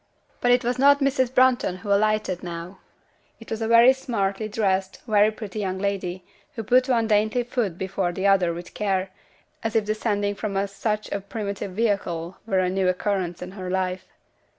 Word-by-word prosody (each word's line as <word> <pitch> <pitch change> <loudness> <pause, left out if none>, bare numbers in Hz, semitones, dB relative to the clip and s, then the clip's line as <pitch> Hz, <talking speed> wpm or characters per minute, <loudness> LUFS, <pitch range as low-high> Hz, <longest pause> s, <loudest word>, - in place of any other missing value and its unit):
But 245 - +1
it 245 +1 +4
was 245 +1 -1
not 285 +1 +6
Mrs. 265 -3 +1
Brunton 255 -7 +3
who 200 +2 -1
alighted 215 -3 +1
now; 175 +2 -7 0.6
it 225 - -13
was 225 0 -3
a 225 - 0
very 235 +3 +7
smartly 215 -5 -2
dressed, 195 -3 -1
very 210 -2 +4
pretty 215 -1 -7
young 190 -2 -2
lady, 190 -2 -3 0.3
who 225 - -4
put 255 +4 +3
one 235 -3 +2
dainty 215 +3 +2
foot 235 -7 -2
before 190 -1 -2
the 190 +2 -3
other 195 -3 +4
with 175 +1 -8
care, 190 -2 -1 0.5
as 225 0 -2
if 220 -2 +2
descending 205 -1 -1
from 200 -1 -4
such 210 +2 -3
a 200 - -2
primitive 200 -1 -5
vehicle 190 -5 -1
were 195 - +1
a 185 - +1
new 190 0 +1
occurrence 185 -2 -2
in 180 - -8
her 185 -2 -6
life. 185 0 -2
200 Hz, 180 wpm, -24 LUFS, 190-225 Hz, 0.6 s, very